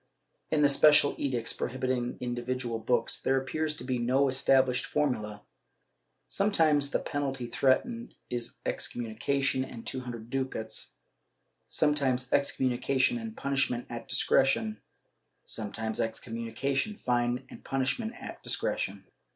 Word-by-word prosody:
^ - - -44 0.5
In 150 -1 +2
the - - +7
special 145 0 +6
edicts 125 -5 -1
prohibiting 125 -1 -2
individual 120 -1 -3
books, 120 +2 0
there 135 0 +2
appears 155 +3 -2
to - - -5
be 130 -1 -1
no 130 +4 +3
established 130 -1 +3
formula. 105 -8 -1 0.8
Sometimes 160 -8 +3
the - - +1
penalty 135 -4 -3
threatened 185 - 0
is 120 -1 -4
excommunication 130 +4 -1
and 120 -3 -9
two 130 - -3
hundred 120 -2 -7
ducats, 130 -4 -3 0.7
sometimes 135 -4 +2
excom 135 -2 +2
munication 135 - +1
and 225 0 -7
punishment 135 -3 0
at 115 -1 -6
discretion, 110 -5 +2 0.6
sometimes 110 +1 -2
excommimi 115 0 -3
cation, 140 +10 0
fine 120 0 0
and - - -11
punishment 135 - -1
at - - -8
discretion. - - -1
130 Hz, 125 wpm, -29 LUFS, 120-140 Hz, 0.8 s, the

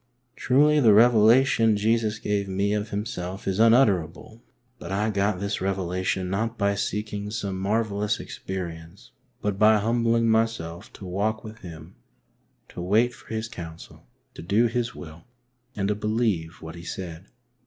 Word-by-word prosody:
" - - -46
Truly 150 +4 +3
the 110 -7 +6
revelation 115 0 +5
Jesus 110 0 +1
gave 105 -2 -2
me 100 +2 0
of 105 0 -2
Himself 100 -3 -5
is 95 +1 -1
un 115 0 +6
utterable, 100 - 0 0.4
but - - -8
I 105 +3 0
got 100 -1 0
this 100 +1 -3
revelation 95 -1 -1
not 110 +5 -2
by 100 -1 +1
seeking 105 0 -3
some 100 -3 -4
marvellous 105 +1 0
experience, 85 -1 -7 0.3
but 105 -1 -1
by 110 0 +6
humbling 115 +1 +1
myself 110 -7 -1
to 95 - -10
walk 105 +5 -2
with 110 0 -10
Him, 85 0 -11 0.7
to - - -8
wait 110 +7 +2
for - - -17
His 110 0 -3
counsel, 80 - -10 0.3
to - - -10
do 100 +7 +2
His 120 0 -2
will 80 -1 -11 0.5
and 100 -1 -1
to - - +2
believe 105 -7 -2
what 80 0 -7
He 85 - -10
said. 85 +1 -7
105 Hz, 155 wpm, -25 LUFS, 95-110 Hz, 0.7 s, the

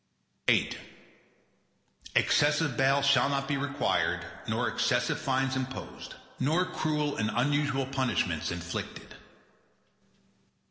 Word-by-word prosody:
VIII - - +4 1.4
Excessive 145 -2 +3
bail 135 +2 +3
shall 135 -1 +4
not 140 -1 -1
be 145 - 0
required 140 +1 0 0.2
nor - - 0
excessive - - +1
fines 135 0 0
imposed, 130 0 -6 0.2
nor 160 +7 +2
cruel 150 -4 -1
and 110 0 0
unusual 145 +2 +1
punishments 130 - -1
inflicted. 85 -1 -6
135 Hz, 95 wpm, -29 LUFS, 130-145 Hz, 1.4 s, VIII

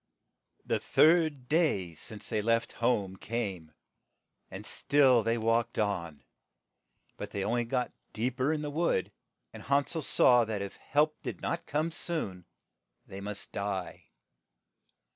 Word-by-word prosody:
The - - 0
third 155 -5 +3
day 145 - +1
since 105 +7 -8
they 105 - 0
left 115 +1 +1
home 105 -6 0
came, 95 -10 -4 0.8
and - - -8
still 135 -4 +4
they 115 +2 0
walked 115 +1 +1
on, 85 -9 -2 0.9
but - - -6
they 100 - -3
on - - -1
ly 120 0 +1
got 125 +1 -1 0.2
deep 125 +4 -2
er 130 +4 +2
in 155 -1 -1
the 145 - -3
wood, 155 - 0 0.4
and - - -9
Han 140 0 +2
sel 160 - -3
saw 125 -3 +5
that 110 -3 -3
if 100 - -7
help 150 +1 +1
did - - -5
not 170 - -3
come 155 +3 0
soon 155 - -3 0.6
they 95 +1 -9
must 105 0 -6
die. 100 -2 -4
115 Hz, 145 wpm, -30 LUFS, 100-145 Hz, 0.9 s, saw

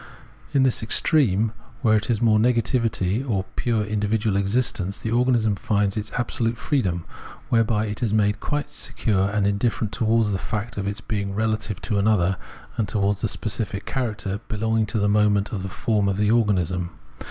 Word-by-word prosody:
In 140 -3 +3
this 130 -2 +2
extreme 110 - +2 0.3
where 110 -1 +5
it 110 +3 0
is 115 -1 +1
mere 110 -2 +4
nega 115 +1 +3
tivity, 115 -2 0
or 100 -8 -1
pure 115 -3 0
individual 105 0 0
existence, 100 -1 0
the 110 - -4
organism 120 -3 +2
finds 100 -1 0
its 110 0 -4
absolute 115 -1 -1
freedom, 95 - -1 0.4
whereby 115 -3 +2
it 105 -1 -5
is 115 -4 +1
made 105 -1 +2
quite 145 0 -3
se - - -4
cure 100 -3 +1
and 105 -1 0
indifferent 105 +1 0
towards 115 -2 +2
the 95 - -1
fact 105 +5 -4
of 100 -1 -3
its 100 +1 -3
being 100 -2 -3
rela 110 0 0
tive 105 -3 -6
to 105 -3 0
another 95 -3 +2 0.4
and 110 - 0
towards 100 -1 0
the 110 - +1
specific 100 -1 -3
character 105 -6 -2
belonging 110 0 0
to 110 - -2
the 105 -1 +2
moments 105 -1 +2
of 100 - -3
the 95 - -4
form 105 0 0
of 95 - -1
the 105 0 +2
organism. 90 -6 +1
105 Hz, 185 wpm, -23 LUFS, 100-115 Hz, 0.4 s, where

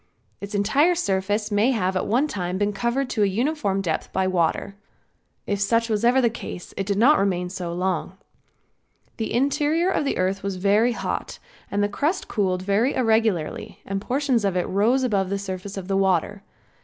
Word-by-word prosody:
Its 200 +1 -6
entire 275 - +3
surface 205 - -1
may 205 +4 +3
have 190 -7 0
at 185 - -1
one 255 +8 +2
time 180 -7 -3
been 205 +1 0
covered 240 +6 -1
to 245 -4 -2
a 205 - +4
uniform 205 -2 0
depth 165 -5 -3
by 190 - 0
water. 185 +2 0 0.7
If 200 -1 -2
such 230 +3 +2
was 215 0 0
ever 245 +2 +4
the 245 - +4
case 195 -6 -8
it 195 - -3
did 200 -1 0
not 270 +8 +5
remain 180 -2 0
so 180 -2 -5
long. 180 +1 -2 1.0
The 220 - -3
interior 295 +7 +1
of 305 - 0
the 280 - -1
earth 190 +2 0
was 200 -1 -3
very 205 +6 +2
hot 235 - -4 0.3
and 205 0 0
the - - +2
crust 295 - -1
cooled 185 -4 -1
very 205 +7 +1
irregularly 220 -5 0
and 195 0 -3
portions 260 -1 0
of 195 -2 0
it 180 - +1
rose 230 +7 +2
above 200 -6 0
the 200 - -1
surface 195 0 -6
of 185 -2 -6
the 195 - 0
water. 190 +1 +1
205 Hz, 190 wpm, -23 LUFS, 190-240 Hz, 1.0 s, not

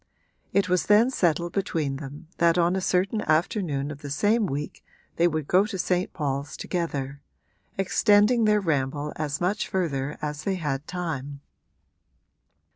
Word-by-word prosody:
It 200 - +2
was 180 -1 +1
then 220 +5 +5
settled 170 - +1
between 160 -8 -1
them 145 +3 -9
that 170 0 +4
on 175 +1 +3
a 190 - -1
certain 190 +4 +1
afternoon 155 - 0
of 145 -1 -9
the 145 - -7
same 205 +9 +2
week 145 -1 -5 0.3
they 170 - +4
would 155 -3 -2
go 190 +3 +4
to 195 - -5
St. 180 0 0
Paul's 140 -2 -3
together, 140 -6 -3 0.6
extending 210 +4 +4
their 210 -1 +3
ramble 145 -3 -1
as 150 -1 -2
much 190 +4 0
further 150 -6 -2
as 150 0 -4
they 195 - 0
had 150 -5 -3
time. 145 -6 -4
170 Hz, 150 wpm, -26 LUFS, 145-190 Hz, 0.6 s, then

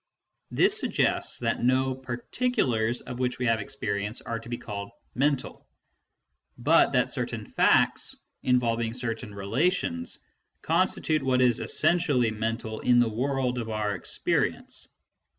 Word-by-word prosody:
This - - +3
suggests - - 0
that - - -1
no 130 +1 +2
particulars 125 - -1
of 125 0 -7
which 125 -1 0
we 125 - -2
have 115 -2 +2
experience 100 +1 -3
are 115 -1 -4
to 115 +1 -12
be 120 - -3
called 100 -3 -6 0.2
"mental," 140 0 -1 0.9
but - - +4
that - - +2
certain - - -3
facts, - - +2 0.3
involving 115 -2 +1
certain 115 -2 -3
relations, 100 - -1 0.5
constitute 155 -2 +1
what 130 -1 +2
is 125 -3 +4
essentially 145 -10 +2
mental 110 0 -3
in 125 -1 +4
the 120 -2 +3
world 125 +2 -1
of 115 -1 -4
our 105 -1 -1
experience. 95 - -1
120 Hz, 130 wpm, -27 LUFS, 110-130 Hz, 0.9 s, but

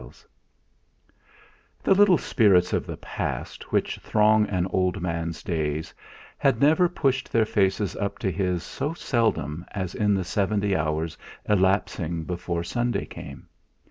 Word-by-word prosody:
III - - -12 1.7
The - - +5
little 195 -2 +6
spirits 100 -11 +3
of - - -1
the - - -5
past - - -5
which - - 0
throng 105 0 +3
an 90 -3 0
old 90 -1 +1
man's 85 -1 -3
days 80 -3 -2 0.5
had 135 -4 +2
never 160 +6 +4
pushed 135 -6 -1
their 115 -1 +3
faces 100 -2 0
up 100 -1 -3
to 95 - -1
his 90 -1 -1
so 150 - -4
seldom 85 - -1
as 95 -3 -3
in 105 -2 +2
the 95 - -1
seventy 100 +2 0
hours 80 +1 -2 0.3
elapsing 95 -4 +1
before 85 0 -3
Sunday 120 +6 -1
came. - - -10
95 Hz, 140 wpm, -25 LUFS, 85-110 Hz, 1.7 s, little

